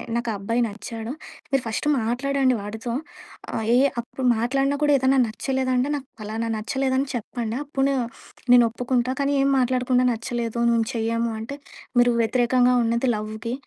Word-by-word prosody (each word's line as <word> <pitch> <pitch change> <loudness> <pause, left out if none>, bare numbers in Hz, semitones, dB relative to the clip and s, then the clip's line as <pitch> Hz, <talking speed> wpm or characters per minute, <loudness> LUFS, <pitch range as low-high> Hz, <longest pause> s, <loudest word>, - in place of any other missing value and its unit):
నాకు 235 0 -1
ఆ - - -2
అబ్బాయి 230 +5 -1
నచ్చాడు. 225 +2 -6 0.4
మీరు 270 -2 +2
ఫస్ట్ 225 +5 -3
మాట్లాడండి 255 +3 +1
వాడితో. 220 +3 -5 0.6
ఆహ్, 220 - -2
ఏ - - +5 0.2
అప్పుడు 250 +2 -6
మాట్లాడినా 270 +4 +1
కూడా 295 - +3
ఏదన్నా 265 +1 +3
నచ్చలేదంటే 260 +3 -1
నాకు 270 -2 -6
ఫలానా 220 +2 -3
నచ్చలేదని 265 +4 0
చెప్పండి. 235 -1 -4
అప్పుడు 275 -1 0 0.6
నేను 245 -1 +8
ఒప్పుకుంటా. 250 +1 -1
కానీ 280 +1 +1
ఏం 275 - +3
మాట్లాడకుండా 250 0 +2
నచ్చలేదు. 230 0 -4
మేము 230 -1 +2
చెయ్యము 230 0 0
అంటే 265 +6 -6 0.4
మీరు 245 0 +5
వ్యతిరేకంగా 250 +2 +3
ఉన్నది 235 +2 +1
లవ్‌కి 215 +2 -5
245 Hz, 145 wpm, -24 LUFS, 230-260 Hz, 0.6 s, నేను